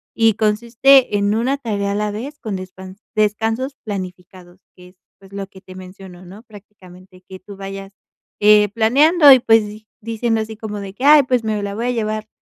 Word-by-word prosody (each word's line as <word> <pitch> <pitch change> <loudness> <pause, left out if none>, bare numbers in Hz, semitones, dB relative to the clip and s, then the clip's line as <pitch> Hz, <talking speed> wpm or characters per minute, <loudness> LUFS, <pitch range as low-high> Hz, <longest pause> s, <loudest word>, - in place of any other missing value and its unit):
y 225 -2 +3
consiste 235 +3 +2
en 205 +1 0
una 260 +5 -1
tarea 205 -6 -3
a - - -3
la 210 0 -2
vez 275 +8 -8
con 215 -4 -5
descan 185 +1 -10 0.2
descansos 225 +5 -1
planificados, 185 -2 -9 0.2
que 180 0 -16
es, 185 - -25 0.2
pues, 195 0 -19
lo 200 -1 -5
que 190 -1 -17
te 185 -1 -14
menciono, 185 -1 -13
¿no? 195 +4 -13
Prácticamente 185 -4 -17
que 190 0 -11
tú 195 +1 -13
vayas, 195 0 -9 0.5
eh, 210 -1 +5
planeando 280 - +4
y, 260 - +5
pues, 225 -2 +3
di 215 +1 -13
diciendo 225 0 -2
así 220 0 -7
como 210 -2 -7
de 195 -1 -9
que: 250 - -10
"Ay, 295 -1 +7
pues, 250 -2 -1
me 215 -1 -2
la 200 0 -5
voy 235 +3 -3
a - - 0
llevar 215 -2 -3
210 Hz, 200 wpm, -18 LUFS, 195-225 Hz, 0.5 s, Ay